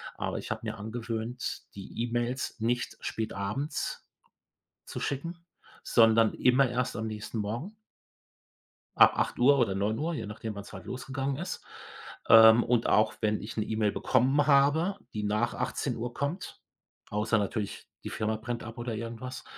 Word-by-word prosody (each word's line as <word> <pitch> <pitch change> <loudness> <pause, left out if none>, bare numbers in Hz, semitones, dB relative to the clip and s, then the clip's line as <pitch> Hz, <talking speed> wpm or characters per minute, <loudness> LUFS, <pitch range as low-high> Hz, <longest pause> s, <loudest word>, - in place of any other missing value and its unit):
Aber - - -3
ich - - -7
habe - - -3
mir - - -4
angewöhnt, 115 +2 -4
die 100 +4 -5
E-Mails 120 +2 -2
nicht 120 +2 -1
spätabends 110 +6 -3 0.8
zu - - -6
schicken, 165 +5 -3 0.5
sondern 115 -1 +5
immer 125 +1 +4
erst 125 +1 -1
am 110 0 -3
nächsten 110 +1 -5
Morgen 120 - -3 1.2
ab - - +7
8:00 140 +3 +4
oder 105 -6 +2
9:00, 110 +12 -1
je 125 - -4
nachdem, 105 +1 -6
wann's 100 0 -9
halt - - -9
losgegangen 135 +2 -3
ist. 175 +4 -5 0.6
Ähm, 115 +1 +9
und 120 -1 +2
auch 110 +1 +4
wenn 105 -1 +1
ich 110 +2 -7
'ne 110 - 0
E-Mail 110 -2 0
bekommen 135 +3 +2
habe, 150 +7 +4 0.2
die 105 - -2
nach 105 +3 0
18:00 120 +1 -3
kommt, 145 +7 -4 0.5
außer 110 +1 +1
natürlich 105 0 -3 0.2
die - - -4
Firma 110 0 -1
brennt 120 +1 -5
ab 115 +1 -9
oder 120 -1 -3
irgendwas, 115 +3 -6
115 Hz, 145 wpm, -29 LUFS, 110-130 Hz, 1.2 s, Ähm